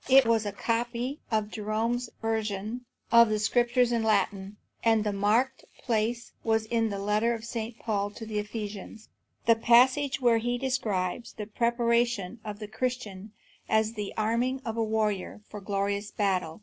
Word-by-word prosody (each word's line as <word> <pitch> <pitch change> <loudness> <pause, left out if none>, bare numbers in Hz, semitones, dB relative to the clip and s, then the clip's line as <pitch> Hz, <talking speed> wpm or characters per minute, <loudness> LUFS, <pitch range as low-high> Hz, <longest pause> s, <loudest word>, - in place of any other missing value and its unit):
It 265 0 +7
was 225 -2 +2
a - - -2
copy 240 +6 -2
of 215 -2 0
Jerome's 225 +3 -1
version 220 +1 -2 0.3
of 235 -1 +7
the 215 - +1
Scriptures 240 +3 +2
in 235 -1 +1
Latin, 200 -2 0 0.3
and 225 -2 +4
the 210 -1 -1
marked 225 +7 +1 0.2
place 230 +1 -1
was 220 -1 +1
in 225 0 +1
the 200 - -3
letter 210 +4 +1
of 225 0 -8
St. 230 -1 -5
Paul 205 -3 -1
to 225 +2 -9
the 215 -1 -2
Ephesians, 210 0 -6 0.4
the 230 - +7
passage 255 +5 +4
where 240 -3 +4
he 240 +2 -1
describes 235 -6 -2
the 210 - -6
preparation 235 -1 0
of 210 -1 -6
the 210 -1 -7
Christian 215 -4 -4 0.4
as 220 0 +2
the 210 -3 -4
arming 240 +5 0
of 225 -1 -3
a 230 - +1
warrior 215 -2 -1
for 210 - -8
glorious 200 +1 -1
battle. 185 -6 -1
220 Hz, 160 wpm, -28 LUFS, 210-235 Hz, 0.4 s, It